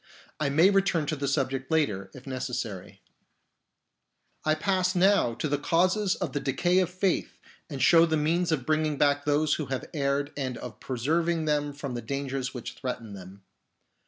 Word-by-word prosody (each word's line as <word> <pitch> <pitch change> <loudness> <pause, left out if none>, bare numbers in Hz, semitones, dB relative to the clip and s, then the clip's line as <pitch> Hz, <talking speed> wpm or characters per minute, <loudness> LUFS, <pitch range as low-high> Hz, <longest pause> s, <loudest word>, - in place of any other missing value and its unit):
I 150 -2 +1
may 165 +8 +5
return 195 -5 +2
to 155 - -1
the 140 -1 -3
subject 135 -1 -1
later, 105 -12 0
if 130 - -12
necessary. 110 -7 -5 1.4
I 155 0 +2
pass 185 +3 0
now 185 - +3
to 135 - -2
the 145 -1 0
causes 185 +6 +2
of 170 -8 -4
the 145 - 0
decay 175 +8 +1
of 185 -3 +1
faith 185 0 -1 0.3
and 140 -4 -3
show 165 0 +6
the 160 -1 +1
means 165 +3 +1
of 140 -6 -1
bringing 155 -1 +1
back 145 0 +2
those 150 0 +2
who 155 - -2
have 130 0 -3
erred 140 -1 -1
and 130 -4 -3
of 125 -3 -9
preserving 160 +6 0
them 145 -1 0
from 140 -2 -6
the 120 - -4
dangers 135 +1 -3
which 125 -3 -7
threaten 115 -5 -5
them. 95 0 -11
145 Hz, 175 wpm, -27 LUFS, 130-165 Hz, 1.4 s, show